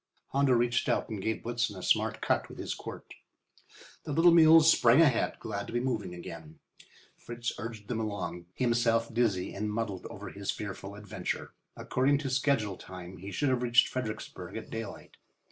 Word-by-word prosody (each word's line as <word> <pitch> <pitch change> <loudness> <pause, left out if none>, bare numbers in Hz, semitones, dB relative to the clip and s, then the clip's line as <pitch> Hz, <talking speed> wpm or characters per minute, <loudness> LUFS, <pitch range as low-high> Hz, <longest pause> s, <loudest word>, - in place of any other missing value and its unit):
Hondo 140 -1 +3
reached 120 0 +2
out - - 0
and 105 -3 -4
gave 110 +3 -2
Blitzen 120 -2 -1
a 90 - -8
smart - - +1
cut - - 0
with - - -11
his - - -3
quirt. - - -9 0.9
The - - -5
little 165 +4 +6
mules 165 -1 +8
sprang 120 +3 +5
ahead, 145 -8 +3
glad 100 -2 -4
to - - -8
be 120 - +1
moving 110 -8 -2
again. 80 -2 -9 0.6
Fritz 120 0 -5
urged 110 -1 -7
them 115 -2 -2
along, 90 -5 -4
himself 115 -2 +1
dizzy 110 -6 +1
and 105 +1 -3
muddled 105 -4 -3
over - - -8
his 100 -1 -7
fearful 100 -1 -4
adventure. 105 -1 -5 0.2
According 135 +3 +2
to 140 -2 -3
schedule 130 -8 +1
time, 90 0 -10
he 95 +4 -8
should 135 +9 0
have 130 -2 +1
reached 120 -1 +4
Fredericksburg 120 -4 -5
at - - -8
daylight. 115 0 -7
115 Hz, 175 wpm, -30 LUFS, 100-125 Hz, 0.9 s, mules